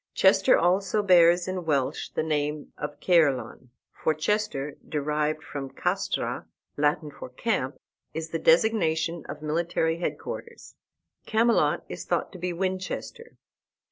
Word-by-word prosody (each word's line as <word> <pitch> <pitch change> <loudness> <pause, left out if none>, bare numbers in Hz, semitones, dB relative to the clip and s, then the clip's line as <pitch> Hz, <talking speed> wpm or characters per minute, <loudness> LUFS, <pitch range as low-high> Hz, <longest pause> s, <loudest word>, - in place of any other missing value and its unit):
Chester - - +5
also 195 +4 +2
bears 175 -2 +5
in 185 -1 -3
Welsh 140 -5 0
the - - -2
name 150 -1 -2
of 150 0 -6
Caerleon; 135 -8 +2 0.2
for 155 - 0
Chester, 155 -5 -1
derived 150 +1 -1
from 140 -2 -6
castra, - - -2 0.3
Latin 150 +1 +1
for 140 - -9
camp, 130 - -2 0.3
is 160 0 -5
the 165 - -1
designation 165 -3 +2
of 150 - -7
military 165 +1 0
headquarters. 470 - -6 0.5
Camelot 230 +2 +3
is - - -6
thought - - -1
to 185 - -10
be 180 +1 -2
Winchester. 185 - -4
160 Hz, 125 wpm, -27 LUFS, 150-185 Hz, 0.5 s, Chester